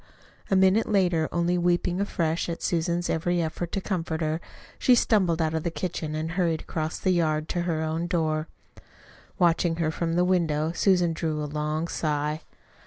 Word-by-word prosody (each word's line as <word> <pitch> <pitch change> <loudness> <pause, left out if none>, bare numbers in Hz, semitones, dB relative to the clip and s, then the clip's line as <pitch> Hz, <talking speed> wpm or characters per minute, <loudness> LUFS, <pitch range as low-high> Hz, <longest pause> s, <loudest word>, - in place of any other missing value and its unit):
A 195 - +3
minute 190 +3 +4
later, 180 -6 +2
only 175 +1 +1
weeping 175 +1 +1
afresh 170 -4 -1
at 170 - -5
Susan's 170 +1 0
every 175 +2 0
effort 170 +1 -3
to 195 - -1
comfort 170 -4 -2
her, 155 +1 -1 0.4
she 250 - +5
stumbled 185 -8 +2
out 160 0 -1
of 160 - 0
the 170 - -1
kitchen 165 -3 -4
and 160 +1 -3
hurried 165 -3 0
across 155 0 -3
the 185 - +1
yard 155 -3 +1
to 175 - -1
her 160 -1 0
own 160 +2 -2
door. 160 -3 0 0.9
Watching 170 -1 +3
her 165 -2 0
from 165 0 -2
the 180 +1 +3
window, 165 -4 +1
Susan 175 -1 +2
drew 155 -2 -2
a - - -2
long 150 +2 -2
sigh. 150 -1 -1
165 Hz, 175 wpm, -26 LUFS, 155-175 Hz, 0.9 s, she